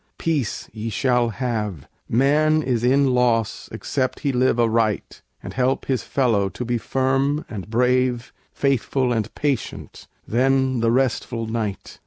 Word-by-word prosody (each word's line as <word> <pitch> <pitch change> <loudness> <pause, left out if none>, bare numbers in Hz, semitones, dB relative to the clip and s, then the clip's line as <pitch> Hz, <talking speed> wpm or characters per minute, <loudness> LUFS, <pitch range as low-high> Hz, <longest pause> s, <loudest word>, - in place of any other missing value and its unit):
peace 150 -9 -2
ye 110 +1 -4
shall 125 0 +1
have: 105 - -3 0.2
Man 150 +5 +3
is 120 -4 0
in 135 +1 +3
loss 120 -3 +1
except 130 -2 -2
he 140 - +1
live 125 -1 +2
aright, 115 -3 0 0.2
And - - -7
help 130 +1 0
his 130 -3 0
fellow 110 -8 +1
to 100 +6 -6
be 120 0 -1
firm 135 +5 0
and 100 -2 -7
brave, 125 +1 +1 0.2
Faithful 135 -2 0
and 110 -3 -2
patient: 140 -7 -3 0.2
then 130 +1 +2
the 115 0 +2
restful 120 -2 0
night! 110 -3 -4
125 Hz, 140 wpm, -22 LUFS, 115-135 Hz, 0.2 s, Man